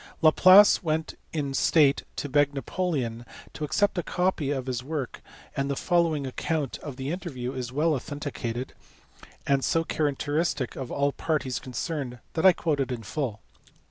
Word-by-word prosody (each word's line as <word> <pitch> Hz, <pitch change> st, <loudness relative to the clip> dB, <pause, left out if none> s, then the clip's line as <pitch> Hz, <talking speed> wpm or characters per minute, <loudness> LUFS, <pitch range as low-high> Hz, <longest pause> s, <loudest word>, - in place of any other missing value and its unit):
Laplace 185 Hz, +6 st, +7 dB
went 160 Hz, -2 st, -1 dB, 0.2 s
in 145 Hz, -4 st, -2 dB
state 145 Hz, 0 st, +4 dB
to -, -, -3 dB
beg 145 Hz, 0 st, +2 dB
Napoleon 135 Hz, -5 st, -2 dB, 0.3 s
to 155 Hz, -, -6 dB
accept 175 Hz, +6 st, +1 dB
a -, -, +1 dB
copy 180 Hz, -4 st, 0 dB
of 135 Hz, -3 st, -2 dB
his 125 Hz, -2 st, -3 dB
work, 145 Hz, -3 st, -4 dB, 0.3 s
and 140 Hz, 0 st, -1 dB
the 140 Hz, -, 0 dB
following 165 Hz, -3 st, +1 dB
account 145 Hz, +1 st, -2 dB
of 145 Hz, -4 st, -7 dB
the 135 Hz, +2 st, -4 dB
interview 135 Hz, -9 st, -4 dB
is 125 Hz, -2 st, -4 dB
well 155 Hz, +4 st, +2 dB
authenticated, 135 Hz, -4 st, -4 dB, 0.7 s
and 140 Hz, -1 st, +2 dB
so 165 Hz, -, +2 dB
characteristic 145 Hz, -2 st, -1 dB
of 130 Hz, -3 st, -6 dB
all 140 Hz, 0 st, +1 dB
the -, -, -27 dB
parties 140 Hz, -7 st, 0 dB
concerned 130 Hz, -1 st, -4 dB, 0.2 s
that 165 Hz, +4 st, +4 dB
I -, -, +10 dB
quote 160 Hz, -4 st, -1 dB
it 130 Hz, -2 st, -1 dB
in 120 Hz, -2 st, -4 dB
full. 115 Hz, -2 st, -3 dB
145 Hz, 165 wpm, -27 LUFS, 130-160 Hz, 0.7 s, I